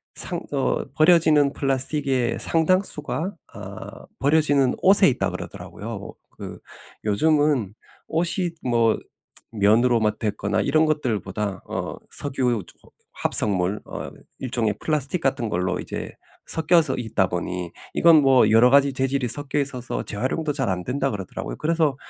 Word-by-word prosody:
상 175 -2 -4
어 135 -2 0
"버려지는 155 -3 +4
플라스틱의 135 -2 0
상당수가 170 +1 0 0.2
어 - - -9
버려지는 145 -2 +3
옷에 195 0 +6
있다." 125 - -1
그러더라고요. - - -8 0.2
그 - - -8 0.5
요즘은 140 -1 +2 0.3
옷이 175 +2 0
뭐 115 -3 +2 0.5
면으로 115 +3 +3
막 105 -1 0
됐거나 105 -1 -1
이런 155 +8 +2
것들 130 -9 0
보다 100 0 -4
어 - - -4
석유 125 -7 -1
저 - - -19
어 - - -21 0.2
합성물 95 0 +1
어 - - -7 0.3
일종의 120 -4 -1
플라스틱 155 +2 -1
같은 130 -3 0
걸로 95 -1 -1
이제 - - -6 0.3
섞여서 160 -3 +2
있다 110 -6 0
보니 90 0 -4 0.2
이건 165 -3 +6
뭐 130 -4 +5
여러 115 +3 +6
가지 140 0 +5
재질이 135 -1 -1
섞여 145 +4 -2
있어서 130 -3 -3
"재활용도 130 +8 -2
잘 135 -5 -1
안된다." 125 +9 -1
그러더라고요. 95 -3 -6
그래서 155 -3 +1
135 Hz, 300 characters per minute, -23 LUFS, 110-155 Hz, 0.5 s, 옷에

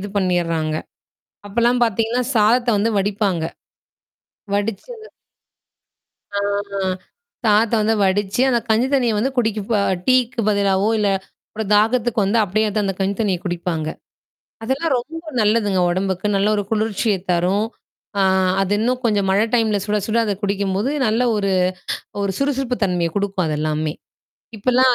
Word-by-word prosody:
இது 205 - -5
பண்ணிர்றாங்க. 165 -5 0 0.7
அப்பலாம் 240 +4 +1
பாத்தீங்கன்னா, 225 +3 0
சாதத்த 235 +3 +3
வந்து 220 +3 +1
வடிப்பாங்க. 195 -3 0 1.1
வடிச்சத 225 - -3 1.3
ஆ - - +1 1.0
சாதத்த 220 +1 +3
வந்து 220 +1 +2
வடிச்சு, 195 +3 0
அந்த 245 -2 +3
கஞ்சி 225 +3 +3
தண்ணிய 245 -5 +2
வந்து 255 +6 +1
குடிக்கப 220 -2 0 0.3
டீக்கு 255 -1 +2
பதிலாவோ 200 -1 +2
இல்ல, 210 -1 +2 0.4
அப்புறம் 215 -2 -5
தாகத்துக்கு 225 +2 +2
வந்து 205 +4 +1
அப்டியே 215 +3 0
வந்து 210 +1 -1
அந்த 195 -1 -1
கஞ்சி 195 +1 0
தண்ணிய 195 -5 +1
குடிப்பாங்க. 175 -3 -2 0.8
அதெல்லாம் 275 +6 -1
ரொம்ப 325 +7 -7 0.2
நல்லதுங்க 210 -3 +2
உடம்புக்கு. 190 +2 -1
நல்ல 200 +1 +2
ஒரு 205 - 0
குளிர்ச்சிய 220 -1 0 0.2
தரும். 185 +5 +1 1.0
அது 195 +1 -1
இன்னும் 250 +3 0
கொஞ்சம் 205 -4 +1
மழ 195 +2 +3
டைம்ல 220 -3 +2
சுட, 210 0 0
சுட 225 +1 +1
அத 205 -2 -1
குடிக்கம்போது 200 +3 0 0.2
நல்ல 220 +3 +1
ஒரு 200 -1 0 0.7
ஒரு 200 - 0
சுறுசுறுப்பு 270 -3 0
தன்மைய 175 -3 0
குடுக்கும் 195 -3 -1
அத 155 -1 -1
எல்லாமே. 155 0 -1 0.7
இப்பலாம் 255 +3 +4
210 Hz, 130 wpm, -20 LUFS, 195-230 Hz, 1.3 s, இப்பலாம்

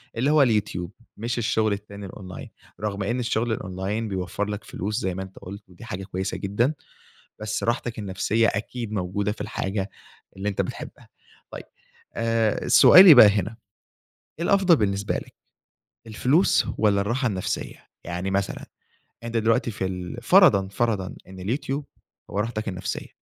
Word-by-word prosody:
اللي 125 +5 +1
هو 155 - +5
اليوتيوب 105 -8 0 0.3
مش 115 +3 -3
الشغل 110 -2 +1
التاني 100 0 -8
الأونلاين، 90 -1 -9 0.3
رغم 100 -1 -3
إن 120 +5 -1
الشغل 120 -1 -1
الأونلاين 100 +3 -3
بيوفر 95 +1 -3
لك 105 0 -5
فلوس 105 +4 -4
زي 95 -5 -2
ما 95 - -4
أنتَ 95 0 -12
قلت 100 +1 -10
ودي 90 +6 -13
حاجة 95 -4 -5
كويّسة 95 0 -4
جدًا. 115 +9 0 0.7
بس 110 -1 -3
راحتك 120 0 -2
النفسيّة 105 +3 0
أكيد 110 +2 -3
موجودة 100 +1 -1
في - - -13
الحاجة 95 0 -3 0.5
اللي 100 +2 -3
أنتَ 100 - 0
بتحبها. - - -8 0.4
طيّب - - -8 0.5
آآ 115 -2 0
سؤالي 185 -3 +9
بقى 120 - +10
هنا 105 +2 -1 0.8
إيه 170 - -1
الأفضل 195 -3 +5
بالنسبة 100 -4 -1
لك - - -6 0.7
الفلوس، 130 - +2
والّا 100 -2 +3
الراحة 120 +6 0
النفسيّة؟ 95 -5 -4 0.2
يعني 90 +3 -3
مثلًا 100 0 -2 0.6
أنت 115 0 -4
دلوقتي 115 +2 +2
في 100 -2 -4
ال 90 -1 -6
فرضًا 130 - +5
فرضًا 100 -3 -1
إن 95 0 -11
اليوتيوب 135 +7 -3 0.4
هو 100 - -4
راحتك 110 -1 -3
النفسيّة 90 -1 -4
105 Hz, 150 wpm, -24 LUFS, 95-115 Hz, 0.8 s, بقى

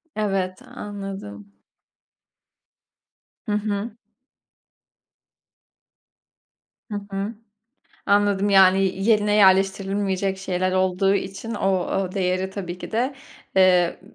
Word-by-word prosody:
Evet, 195 -3 -2
anladım. 195 - -8 1.9
Hı - - -1
hı. 210 +1 -2 2.9
Hı - - -3 0.2
hı. 200 +3 -3 0.7
Anladım, 205 0 +2
yani, 195 0 +4
yerine 210 -2 +3
yerleştirilmeyecek 195 0 +2
şeyler 185 -1 -1
olduğu 185 +1 +2
için 195 +4 -4
o 195 - 0
o 190 0 -1
değeri 185 0 -1
tabii 185 -3 -6
ki - - -9
de, 250 +5 0 0.4
eee, 180 -2 +4
195 Hz, 85 wpm, -23 LUFS, 185-205 Hz, 2.9 s, yani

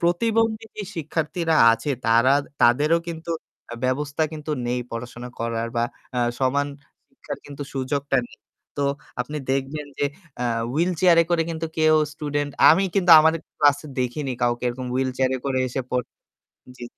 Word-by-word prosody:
প্রতিবন্ধী 225 +5 +1
যে 210 - -4
শিক্ষার্থীরা 160 +1 -1 0.2
আছে 145 +6 -2 0.2
তারা 115 +4 +5 0.3
তাদেরও 145 +8 +4
কিন্তু 165 0 -6 0.4
আ - - -4
ব্যবস্থা 145 +4 -1
কিন্তু 155 0 -6 0.2
নেই 125 +1 -1
পড়াশোনা 120 +1 -6
করার 115 0 -1
বা 115 - +2 0.3
আ - - +1 0.2
সমান 140 +2 +1 0.4
শিক্ষার - - -8
কিন্তু 145 0 -7
সুযোগটা 140 +1 -1
নেই। - - -18 0.4
তো 145 - 0 0.4
আপনি 150 +5 -4
দেখবেন 135 +3 -2
যে - - +1 0.4
আ - - 0 0.3
wheelchair 175 +2 +3
এ - - -5
করে 170 -1 +3
কিন্তু 165 0 -3
কেউ 155 0 +5 0.2
স্টুডেন্ট 145 -1 -2 0.2
আমি 185 +5 +4
কিন্তু 180 -3 +3
আমাদের 160 +1 +3 0.2
ক্লাসে 145 +1 +3
দেখিনি 130 +2 -2
কাউকে 120 0 +1
এরকম 125 +1 -5
wheelchair 130 0 0
এ - - -6
করে 130 -1 0
এসে 130 - -3
পড় 125 -1 0 0.7
জি। 120 - -9
145 Hz, 155 wpm, -23 LUFS, 130-160 Hz, 0.7 s, তারা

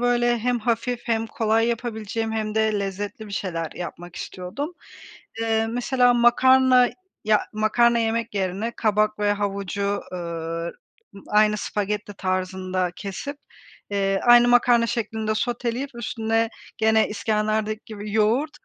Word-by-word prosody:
böyle 240 0 +2
hem 245 +2 0
hafif 235 +1 -1
hem 225 -1 0
kolay 225 +1 +1
yapabileceğim 225 -1 -3
hem 215 -1 -2
de 220 -1 +2
lezzetli 200 +2 -5
bir 205 - -10
şeyler 165 -5 -3
yapmak 175 0 -8
istiyordum. 235 - -5 0.7
Eee, 225 0 +1
mesela 245 +1 +2
makarna 255 +1 +5 0.4
ya, 215 -1 +4
makarna 235 +2 +3
yemek 230 -1 -1
yerine 195 +4 -1
kabak 215 -1 +1
ve 205 0 +2
havucu, 200 0 -2
ııı, 165 -1 -4 0.6
aynı 210 0 +4
spagetti 205 0 -3
tarzında 185 -1 -1
kesip, 210 +9 -6 0.5
eee, 195 -1 +1
aynı 240 0 +7
makarna 240 -1 +4
şeklinde 220 -2 -2
soteleyip 245 +4 -2
üstüne, 225 -1 -1 0.3
gene 220 0 +3
iskenderdeki 215 +1 -1
gibi, 210 -1 -7
yoğurt, 225 +8 +2
220 Hz, 120 wpm, -24 LUFS, 200-235 Hz, 0.7 s, aynı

